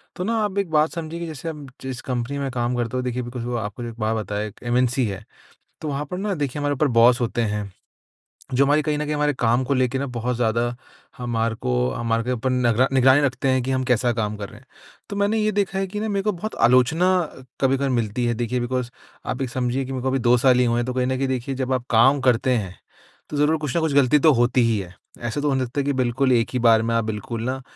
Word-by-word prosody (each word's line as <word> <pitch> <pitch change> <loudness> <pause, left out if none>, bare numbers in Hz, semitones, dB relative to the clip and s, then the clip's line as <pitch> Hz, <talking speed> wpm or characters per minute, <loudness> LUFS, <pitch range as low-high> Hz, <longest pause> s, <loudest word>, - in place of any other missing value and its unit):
तो 180 - -3
ना 225 +4 0
आप 200 -1 -2
एक 195 -3 -1
बात 155 +1 +3
समझिए 165 0 -5
कि 170 - -4
जैसे 160 +1 -6
आप 150 -3 -8
जिस 130 -1 -5
कंपनी 125 +3 -2
में 135 -1 -2
काम 120 0 -1
करते 120 +1 -2
हो 125 - -1
देखिए, 125 0 -2
बिकॉज़ 120 0 -6
वो 120 0 -3
आपको 105 +1 -5
जो 120 - -4
एक 115 0 -12
बात 110 +1 0
बताए, 105 0 -3
एक 105 - -13
एमएनसी 125 +1 +1
है। 100 +1 -6 0.6
तो 155 - -4
वहाँ 145 0 -2
पर 180 - -3
ना, 200 0 -1
देखिए, 145 -3 -3
हमारे 145 0 0
ऊपर 145 +2 +1
बॉस 120 +2 +6
होते 120 0 0
हैं, 105 -2 -2 0.8
जो 140 +2 +4
हमारी 145 +2 +3
कहीं 150 0 -1
न 150 - -2
कहीं 150 - -2
हमारे 150 0 +1
काम 120 +2 +2
को 140 - +1
लेके 130 0 +1
ना, 140 - -1
बहुत 125 0 -2
ज़्यादा 120 +1 0 0.4
हमारे 115 -2 -1
को 65 - -1 0.2
हमारे 115 -1 -1
के 125 - -2
ऊपर 125 +1 -1
नगरा 125 0 +2
निगरानी 130 +2 +5
रखते 135 -1 0
हैं 130 -1 +2
कि 135 - -2
हम 130 0 0
कैसा 125 -1 +2
काम 105 -2 -2
कर 100 -1 -6
रहे 105 - -13
हैं। 130 - -24 0.4
तो 200 - -5
मैंने 205 +2 +1
ये 215 0 +1
देखा 200 -2 -1
है 195 - -1
कि 210 +3 -5
ना, 220 - -2
मेरे 200 -1 -1
को 210 - +1
बहुत 210 +4 -6
आलोचना 130 +8 +4 0.5
कभी-कभार 135 0 +2
मिलती 120 -1 -1
है। 120 - +1
देखिए, 120 +2 -1
बिकॉज़, 125 0 -2 0.4
आप 125 - -3
एक 130 - -2
समझिए 125 +2 -1
कि 130 - -7
मेरे 130 -1 -3
को - - -1
अभी 135 +1 0
2 120 0 +4
साल 125 0 +4
ही 125 - +4
हुए 120 0 +1
हैं, 120 - -1
तो 125 - -3
कहीं 125 0 0
न 130 0 0
कहीं 135 +1 0
देखिए, 130 +1 -2
जब 130 0 -1
आप 125 -2 -2
काम 130 +5 +5
करते 130 0 +2
हैं, 95 -4 -5 0.5
तो 150 - -4
ज़रूर 150 +2 +3
कुछ 150 +1 -2
न - - +4
कुछ 160 -3 0
गलती 140 +1 +4
तो 155 - +6
होती 120 +1 +3
ही 115 -2 +2
है। 90 -2 -8 0.3
ऐसा 120 +5 -2
तो 150 - +1
हो 135 - +1
नहीं 130 - 0
सकता 130 +4 -4
है - - -4
कि 145 - +1
बिल्कुल 130 +1 +1
एक 115 -1 +2
ही 125 - 0
बार 115 -2 +5
में 115 - -1
आप 115 - +2
बिल्कुल 110 +1 -4
ना, 130 +2 -3
125 Hz, 275 wpm, -23 LUFS, 120-145 Hz, 0.8 s, बॉस